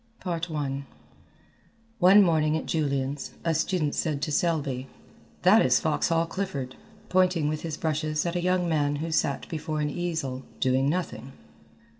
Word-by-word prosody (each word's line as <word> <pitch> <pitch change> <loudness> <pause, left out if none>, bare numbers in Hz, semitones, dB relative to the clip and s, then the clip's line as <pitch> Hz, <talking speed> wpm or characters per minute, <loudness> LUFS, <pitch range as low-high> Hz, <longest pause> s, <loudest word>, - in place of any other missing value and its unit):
I 155 -6 -2 1.2
One 195 +3 +7
morning 160 -3 +2
at - - -5
Julian's, 140 -3 -2
a 165 - +2
student 160 -1 0
said 155 -4 -1
to 155 - -1
Selby, 145 -6 0 0.6
"That - - +6
is - - +4
Foxhall 165 - +1
Clifford," 155 -8 -4 0.3
pointing 185 -4 +2
with 155 0 -2
his 160 -2 -4
brushes 155 0 -1
at 170 0 -2
a 175 - 0
young 180 0 +1
man 145 -3 +1
who 160 +3 -3
sat 140 -3 0
before 155 -1 -3
an 150 -1 0
easel, 160 -6 -3 0.2
doing 130 +1 +2
nothing. 135 -7 -3
155 Hz, 145 wpm, -27 LUFS, 140-170 Hz, 1.2 s, One